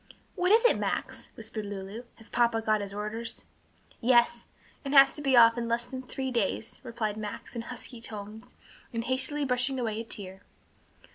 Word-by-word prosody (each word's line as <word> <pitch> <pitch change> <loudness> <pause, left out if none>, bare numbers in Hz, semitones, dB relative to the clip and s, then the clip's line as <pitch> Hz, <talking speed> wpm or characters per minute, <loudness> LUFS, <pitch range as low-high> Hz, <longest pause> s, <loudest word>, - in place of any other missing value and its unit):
"What 360 +2 +1
is 455 +3 +6
it, 485 - +5
Max?" - - -3
whispered 220 -1 -4
Lulu, 200 +4 -6
"has 225 - -15
papa 235 -1 +2
got 215 -1 +1
his 200 -1 -5
orders?" 215 +3 -4 0.5
"Yes; 240 -1 +3 0.4
and 280 0 -2
has 275 0 +8
to 295 - -5
be 270 -3 +3
off 230 0 +7
in 235 - -2
less 235 +1 +1
than 260 +1 -6
three 260 0 -4
days," 225 -1 -1
replied 220 -2 -3
Max, 215 +4 -6
in 235 - -2
husky 245 0 -8
tones, 220 +2 -8 0.4
and 230 -1 -2
hastily 260 +4 0
brushing 255 +1 0
away 220 -3 -2
a - - -6
tear. 190 -4 -6
235 Hz, 180 wpm, -29 LUFS, 215-255 Hz, 0.5 s, has